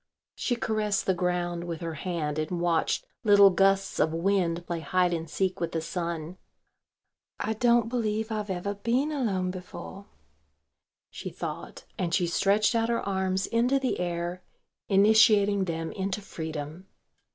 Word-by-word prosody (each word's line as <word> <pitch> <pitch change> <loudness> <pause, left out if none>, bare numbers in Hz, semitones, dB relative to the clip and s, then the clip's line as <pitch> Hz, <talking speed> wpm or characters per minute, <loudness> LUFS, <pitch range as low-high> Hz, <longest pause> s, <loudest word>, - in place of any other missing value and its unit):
She 245 - -1
caressed 215 -3 -1
the 190 - +3
ground 175 -1 -1
with 170 -2 -4
her 165 -1 -3
hand 155 -2 -3
and 165 +3 -2
watched 170 -2 +1 0.2
little 200 -2 +7
gusts 195 +1 +2
of 155 - +3
wind 175 -1 0
play 170 -1 -3
hide 180 +2 +1
and 165 -1 -3
seek 185 +3 -1
with 170 -1 -2
the 165 - 0
sun. 170 0 -4 1.0
"I 220 - -1
don't 235 0 +3
believe 220 -2 -1
I've 210 -2 -3
ever 190 +2 -2
been 240 +8 0
alone 195 -11 -1
before," 185 +2 -9 1.0
she - - -6
thought, - - -7
and 175 -2 0
she 180 - +2
stretched 200 +5 +2
out 230 0 +1
her 235 -3 -1
arms 190 -1 0
into 245 +4 +2
the 265 -2 -1
air, 175 0 -3 0.5
initiating 205 -1 +5
them 165 -2 -3
into 195 0 -3
freedom. 160 -1 -6
190 Hz, 150 wpm, -27 LUFS, 170-210 Hz, 1.0 s, little